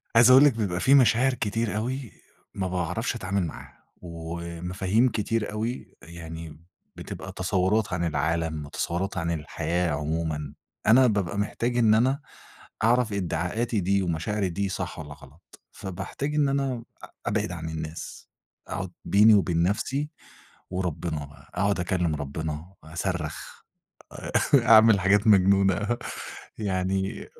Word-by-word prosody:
عايز 120 +2 +8
أقول 130 +2 +9
لِك، 145 -3 +6
بيبقى 100 -6 -2
في 130 - +4
مشاعر 130 0 +4
كتير 110 -2 -1
أوي 125 +2 -3 0.4
ما 95 -1 -2
باعرفش 90 +7 -2
أتعامل 100 -3 -1
معاها، 70 -1 -11 0.2
ومفاهيم 85 +6 -1
كتير 110 -1 -1
أوي، 110 +4 -4
يعني 80 -2 -9 0.4
بتبقى - - -7
تصورات 95 +2 0
عن 90 -1 -1
العالم 80 0 -1
وتصورات 90 +6 -3
عن 85 -1 -1
الحياة 85 +2 -1
عمومًا، 75 -1 -2 0.3
أنا 125 +4 +7
بابقى 100 -4 -1
محتاج 120 +4 -1
إن 110 -3 +5
أنا 130 +5 +3 0.6
أعرف 115 -1 +3
إدعاءاتي 100 +5 -1
دي 100 +2 +1
ومشاعري 95 +3 -1
دي 100 +3 -2
صح 90 -3 -4
والّا 75 -2 -7
غلط، 75 +4 -18
فباحتاج 95 +10 -5
إن 145 -2 +3
أنا 135 -3 -1 0.2
أ - - -8 0.2
أبعد 105 -1 -1
عن 80 -2 -5
الناس، 80 0 -7 0.4
أقعد 90 -1 -4
بيني 105 +5 +6
وبين 90 -5 +3
نفسي، 135 +10 -1 0.6
وربنا 85 -4 -3
بقى، 70 +1 -17
أقعد 100 +2 +1
أكلم 90 -3 0
ربنا، 75 +4 -5
أصرخ 80 -1 -4 0.9
أ 135 - +7
أعمل 110 -2 +7
حاجات 100 +3 +3
مجنونة 100 +2 +4 0.6
يعني 95 -1 -2
95 Hz, 130 wpm, -26 LUFS, 85-110 Hz, 0.9 s, أقول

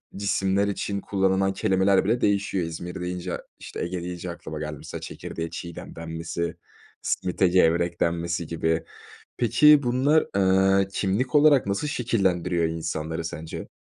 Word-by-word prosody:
cisimler 100 0 +1
için 100 0 -2
kullanılan 95 0 +1
kelimeler 95 -1 +2
bile 115 +4 +1
değişiyor. 100 -3 +1
İzmir 85 +2 -6
deyince, 90 -1 -4 0.2
işte, - - -6
Ege 85 0 -4
deyince 90 0 -5
aklıma 80 -2 -7
geldi, 75 -1 -5
mesela, - - -8
çekirdeğe 80 0 -6
çiğdem 85 0 -8
denmesi, 85 +1 -4 0.5
s - - 0
simite 90 +1 +1
gevrek 85 -1 +2
denmesi 85 0 -1
gibi. 80 0 0 0.5
Peki, 150 +5 +6
bunlar, 130 +5 +3 0.5
eee, 95 - 0
kimlik 105 +8 -1
olarak 145 -4 +6
nasıl 100 +9 -1
şekillendiriyor 95 - 0
insanları 80 0 -3
sence? 80 0 -6
90 Hz, 135 wpm, -25 LUFS, 85-100 Hz, 0.5 s, Peki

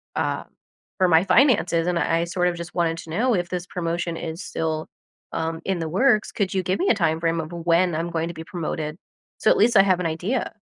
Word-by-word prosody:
uh, - - -1 0.5
for 185 - +3
my 160 +1 +5
finances, 185 - +3
and 180 - +1
I 165 +2 +1
I - - +1
sort 180 +1 0
of 175 - -3
just 170 +1 -8
wanted 165 -1 +1
to 160 - -10
know 235 +8 +1
if 175 -2 -1
this 180 -1 -3
promotion 170 -1 -3
is 165 +3 -5
still, 160 -1 -3 0.5
um, 165 0 -3
in 190 -2 -1
the 165 -1 -3
works. 215 +4 +2
Could 195 -3 -1
you 190 - 0
give 185 +1 -1
me 385 - +1
a - - +6
time 165 -5 +1
frame 165 0 0
of 155 +1 -8
when 170 0 +1
I'm 165 +2 -2
going 165 0 -1
to 170 - -6
be 160 - -7
promoted 160 -2 -4 0.4
so - - +3
at - - +3
least 235 +3 +4
I - - +9
have 185 -2 +2
an 180 - -2
idea? 180 +11 -2
170 Hz, 240 wpm, -23 LUFS, 165-185 Hz, 0.5 s, I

